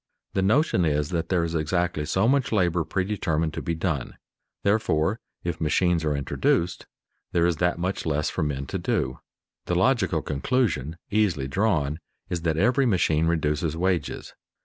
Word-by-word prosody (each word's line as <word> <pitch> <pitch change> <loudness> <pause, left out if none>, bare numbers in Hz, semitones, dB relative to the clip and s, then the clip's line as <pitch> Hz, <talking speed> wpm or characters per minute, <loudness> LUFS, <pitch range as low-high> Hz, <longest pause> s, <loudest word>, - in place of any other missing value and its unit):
The 95 - +1
notion 105 - +3
is 75 -2 +1
that 85 -1 -2
there 90 -3 +2
is 85 0 -2
exactly 80 -1 0
so 95 +6 +2
much 135 0 +2
labor 90 -5 +2
predetermined 80 -3 -1
to - - -4
be 85 -2 -2
done; 80 -6 -2 0.5
therefore, 100 -2 +1 0.2
if 85 -2 -3
machines 85 +1 +2
are 75 -2 +1
introduced, 85 +4 0 0.5
there 85 -1 +3
is 85 -2 +1
that 90 -1 +1
much 90 +3 -2
less 75 -1 0
for - - -2
men 70 -2 -2
to - - -4
do. - - -1 0.5
The 90 - 0
logical 95 - +2
conclusion 80 - -1
easily 100 -10 +1
drawn 80 -4 0 0.3
is 85 -2 -1
that 80 -2 0
every 125 +8 +3
machine 80 -6 +2
reduces 80 -1 0
wages. 90 -3 -1
85 Hz, 160 wpm, -25 LUFS, 75-95 Hz, 0.5 s, notion